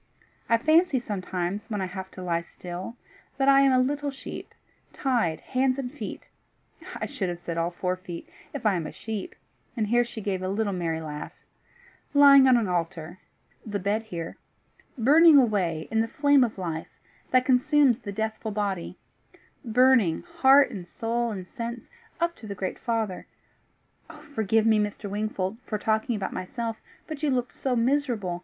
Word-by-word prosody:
I 230 Hz, -, +5 dB
fancy 310 Hz, +3 st, +3 dB
sometimes, 190 Hz, -3 st, -3 dB
when 210 Hz, -2 st, -2 dB
I 190 Hz, -, -1 dB
have 190 Hz, +1 st, -7 dB
to 185 Hz, -, -6 dB
lie 170 Hz, -1 st, 0 dB
still, 180 Hz, +6 st, -8 dB, 0.4 s
that 270 Hz, 0 st, +1 dB
I 275 Hz, 0 st, +7 dB
am 275 Hz, -1 st, +5 dB
a 255 Hz, -, +4 dB
little 285 Hz, +3 st, 0 dB
sheep, 275 Hz, 0 st, -9 dB, 0.4 s
tied 225 Hz, -, 0 dB
hands 255 Hz, 0 st, 0 dB
and 255 Hz, -3 st, -4 dB
feet 295 Hz, -, -7 dB, 0.7 s
I -, -, -3 dB
should 190 Hz, -3 st, -3 dB
have 175 Hz, -, -4 dB
said 170 Hz, -1 st, -5 dB
all 165 Hz, +1 st, 0 dB
four 180 Hz, +1 st, -2 dB
feet, 180 Hz, -2 st, -9 dB, 0.2 s
if 280 Hz, -6 st, -7 dB
I 210 Hz, -, +4 dB
am 170 Hz, -4 st, -2 dB
a -, -, -7 dB
sheep" 220 Hz, -3 st, -6 dB, 0.4 s
and 220 Hz, -, +1 dB
here 240 Hz, +3 st, +3 dB
she 235 Hz, -1 st, -8 dB
gave 195 Hz, -3 st, -2 dB
a 185 Hz, -, -2 dB
little 205 Hz, 0 st, -1 dB
merry 165 Hz, -3 st, -2 dB
laugh 150 Hz, -1 st, -6 dB, 0.8 s
"lying 280 Hz, -2 st, +8 dB
on 255 Hz, -2 st, +6 dB
an 225 Hz, -4 st, 0 dB
altar 170 Hz, 0 st, -3 dB, 0.4 s
the 205 Hz, -2 st, -3 dB
bed 200 Hz, +3 st, 0 dB
here 170 Hz, -7 st, -7 dB, 0.6 s
burning 300 Hz, +6 st, +7 dB
away, 190 Hz, -, +2 dB
in 225 Hz, 0 st, +2 dB
the 225 Hz, -, 0 dB
flame 285 Hz, +2 st, +4 dB
of 230 Hz, -4 st, -2 dB
life, 165 Hz, -4 st, -5 dB, 0.3 s
that 255 Hz, 0 st, +3 dB
consumes 265 Hz, -1 st, +4 dB
the 205 Hz, -4 st, -6 dB
deathful 220 Hz, +1 st, -3 dB
body 200 Hz, -4 st, -3 dB, 0.7 s
burning, 245 Hz, -7 st, +3 dB
heart 285 Hz, -5 st, +5 dB
and 185 Hz, -6 st, -7 dB
soul 235 Hz, +3 st, -2 dB
and 190 Hz, -4 st, -6 dB
sense, 235 Hz, 0 st, -6 dB, 0.3 s
up 340 Hz, 0 st, 0 dB
to 220 Hz, -, -10 dB
the 200 Hz, -, -5 dB
great 185 Hz, -1 st, -4 dB
Father. 225 Hz, -6 st, -2 dB, 1.1 s
Forgive 220 Hz, -2 st, +2 dB
me, 220 Hz, -1 st, +4 dB
Mr. 210 Hz, 0 st, -2 dB
Wingfold, 205 Hz, 0 st, -3 dB
for 215 Hz, -, -3 dB
talking 220 Hz, +2 st, 0 dB
about 205 Hz, -, -3 dB
myself, 225 Hz, +4 st, -4 dB, 0.2 s
but 305 Hz, -2 st, -7 dB
you 305 Hz, -, +1 dB
looked 250 Hz, -2 st, -1 dB
so 260 Hz, -2 st, -1 dB
miserable! 235 Hz, -8 st, 0 dB
220 Hz, 175 wpm, -26 LUFS, 185-255 Hz, 1.1 s, lying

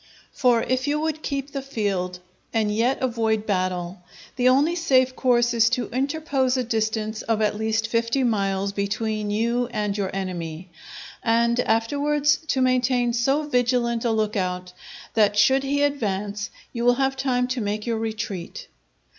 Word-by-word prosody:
For 245 Hz, -4 st, +2 dB
if 255 Hz, +1 st, -1 dB
you 295 Hz, +1 st, +1 dB
would 310 Hz, 0 st, -2 dB
keep 280 Hz, -1 st, -3 dB
the 275 Hz, -, -3 dB
field 200 Hz, -8 st, -2 dB, 0.3 s
and 215 Hz, -2 st, +1 dB
yet 240 Hz, +4 st, +1 dB
avoid 225 Hz, -3 st, 0 dB
battle, 185 Hz, -2 st, -2 dB, 0.4 s
the 255 Hz, 0 st, +3 dB
only 290 Hz, +6 st, +3 dB
safe 260 Hz, -6 st, +2 dB
course 240 Hz, -2 st, +2 dB
is 230 Hz, -1 st, +4 dB
to 250 Hz, 0 st, -1 dB
interpose 270 Hz, 0 st, 0 dB
a 255 Hz, -, +1 dB
distance 220 Hz, -1 st, -1 dB
of 225 Hz, -1 st, 0 dB
at 210 Hz, -1 st, +1 dB
least 220 Hz, +1 st, 0 dB
fifty 230 Hz, +3 st, 0 dB
miles 200 Hz, -4 st, 0 dB
between 210 Hz, +1 st, -2 dB
you 235 Hz, +3 st, 0 dB
and 210 Hz, -4 st, -2 dB
your 200 Hz, -2 st, -1 dB
enemy, 180 Hz, -2 st, -5 dB, 0.5 s
and 235 Hz, +1 st, +2 dB
afterwards 285 Hz, +6 st, +2 dB
to 265 Hz, -3 st, +1 dB
maintain 250 Hz, -1 st, +2 dB
so 270 Hz, +6 st, +1 dB
vigilant 245 Hz, -4 st, +1 dB
a 240 Hz, -, +1 dB
look 215 Hz, -1 st, 0 dB
out, 180 Hz, -2 st, -2 dB, 0.4 s
that 210 Hz, -2 st, +3 dB
should 265 Hz, +5 st, +5 dB
he 285 Hz, +1 st, 0 dB
advance 205 Hz, -7 st, -1 dB, 0.2 s
you 235 Hz, -1 st, -3 dB
will 245 Hz, 0 st, +5 dB
have 270 Hz, +1 st, 0 dB
time 255 Hz, -2 st, 0 dB
to 250 Hz, -1 st, -2 dB
make 210 Hz, 0 st, -2 dB
your 230 Hz, -2 st, -1 dB
retreat. 220 Hz, -, -5 dB
235 Hz, 160 wpm, -24 LUFS, 210-260 Hz, 0.5 s, should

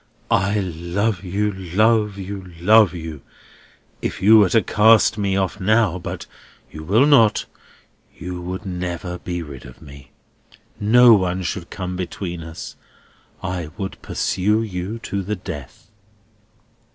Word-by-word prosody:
"I 100 Hz, +2 st, +2 dB
love 90 Hz, +3 st, -2 dB
you, 100 Hz, +3 st, -1 dB
love 105 Hz, +3 st, +1 dB
you, 95 Hz, -1 st, -7 dB
love 105 Hz, 0 st, +5 dB
you! 80 Hz, -4 st, -7 dB, 0.8 s
If -, -, -3 dB
you 110 Hz, +4 st, +7 dB
were 100 Hz, -3 st, +4 dB
to 110 Hz, +4 st, +3 dB
cast 110 Hz, +1 st, +4 dB
me 100 Hz, -2 st, -1 dB
off 95 Hz, +1 st, -1 dB
now—but 100 Hz, -3 st, 0 dB, 0.5 s
you 75 Hz, -, -8 dB
will 110 Hz, -, +3 dB
not—you 105 Hz, -8 st, -1 dB
would 90 Hz, +3 st, -6 dB
never 90 Hz, -1 st, -4 dB
be 90 Hz, -1 st, -4 dB
rid 70 Hz, -5 st, -10 dB
of 65 Hz, -, -13 dB
me. 70 Hz, -1 st, -14 dB, 0.7 s
No 120 Hz, +3 st, +6 dB
one 95 Hz, -2 st, +1 dB
should 85 Hz, -1 st, -4 dB
come 90 Hz, -1 st, -5 dB
between 90 Hz, -1 st, -5 dB
us. 80 Hz, 0 st, -9 dB, 0.7 s
I 90 Hz, -4 st, -3 dB
would 95 Hz, -3 st, -6 dB
pursue 105 Hz, +4 st, 0 dB
you 95 Hz, +1 st, -5 dB
to 100 Hz, -, -3 dB
the 105 Hz, +3 st, -3 dB
death." 85 Hz, -, -9 dB
95 Hz, 130 wpm, -21 LUFS, 90-105 Hz, 0.8 s, you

